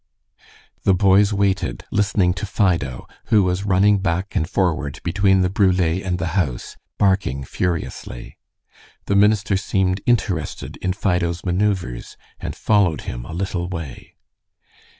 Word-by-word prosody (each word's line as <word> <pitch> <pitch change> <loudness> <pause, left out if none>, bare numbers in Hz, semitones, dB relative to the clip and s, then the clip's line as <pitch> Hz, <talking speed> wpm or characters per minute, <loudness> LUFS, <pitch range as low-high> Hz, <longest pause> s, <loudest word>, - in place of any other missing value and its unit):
The 95 - +3
boys 100 +2 +4
waited, 100 - -1
listening 100 -3 +2
to 105 +3 -5
Fido, 85 - 0 0.2
who 105 -2 +4
was 90 +2 -1
running 100 +1 +4
back 95 +1 -2
and 80 - 0
forward 80 -7 -1
between 95 +2 +2
the 90 - +2
brule 95 -2 +2
and 90 +1 0
the 85 0 -2
house 75 -11 -2 0.2
barking 95 -9 +1
furiously. 80 -5 -4 0.7
The 100 - 0
minister 105 0 +3
seemed 95 0 0
interested 95 -9 -1
in 95 - -2
Fido's 90 -3 -1
manoeuvres, 90 -9 -1 0.2
and - - -5
followed 100 -7 +2
him - - -6
a - - -8
little 90 -1 -3
way. 80 -8 -7
95 Hz, 130 wpm, -21 LUFS, 85-100 Hz, 0.7 s, boys